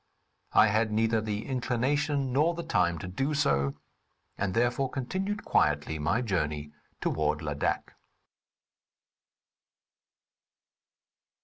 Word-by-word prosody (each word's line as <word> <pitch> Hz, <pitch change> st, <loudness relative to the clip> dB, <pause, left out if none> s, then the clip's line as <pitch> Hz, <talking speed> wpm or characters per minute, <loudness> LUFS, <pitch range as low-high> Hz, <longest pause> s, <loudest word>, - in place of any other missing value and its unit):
I 105 Hz, 0 st, +6 dB
had 110 Hz, +1 st, +1 dB
neither 110 Hz, +1 st, +2 dB
the 105 Hz, 0 st, -3 dB
inclination 135 Hz, +2 st, 0 dB
nor 155 Hz, +5 st, +3 dB
the 170 Hz, -, -4 dB
time 90 Hz, -, +1 dB
to 95 Hz, -, -6 dB
do 135 Hz, +11 st, -1 dB
so, 70 Hz, -, +1 dB, 0.6 s
and, 100 Hz, 0 st, -2 dB
therefore, 120 Hz, +3 st, +1 dB
continued 190 Hz, +12 st, -3 dB
quietly 75 Hz, +1 st, +1 dB
my 95 Hz, +11 st, +1 dB
journey 75 Hz, -8 st, -2 dB, 0.3 s
toward 75 Hz, 0 st, 0 dB
Ladak. 75 Hz, -1 st, -2 dB
110 Hz, 100 wpm, -29 LUFS, 80-135 Hz, 0.6 s, I